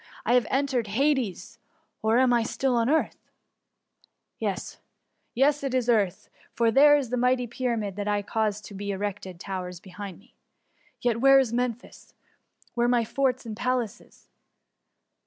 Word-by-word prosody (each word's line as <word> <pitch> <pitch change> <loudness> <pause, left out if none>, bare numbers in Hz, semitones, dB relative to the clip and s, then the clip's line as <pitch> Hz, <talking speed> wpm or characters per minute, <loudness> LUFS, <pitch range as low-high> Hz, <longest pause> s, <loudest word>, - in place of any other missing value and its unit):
Have 245 -2 +3
I - - +1
entered 265 -5 -1
Hades, 255 - -1 0.4
or 220 +2 +2
am 255 -1 +4
I 240 - +3
still 250 +2 -1
on 235 +1 +2
earth? 315 +2 +1 0.6
— - - -40
^yes, - - -3 0.6
yes, 285 +4 +3
it 265 -2 -1
is. 255 -2 +1
still 240 -1 +4
the - - +5
earth, 185 -3 -6 0.3
for 230 -1 +3
there 290 +2 +6
the 250 +1 -3
mighty 250 0 +2
Pyramid 230 -5 -3
I 205 -1 0
caused 210 -1 -2
to 205 - -10
be 200 +1 -5
erected 190 -2 -4
towers 180 -2 -5
behind 190 0 -9
me. 205 - -23 0.7
Yet 235 -2 0
where 270 0 +7
is 255 -4 +2
Memphis? 245 -1 -4 0.6
where 240 0 +1
my 240 -2 +2
forts 255 +1 -1
and 220 -2 -6
palaces? 245 -2 -3
235 Hz, 155 wpm, -26 LUFS, 205-255 Hz, 0.7 s, where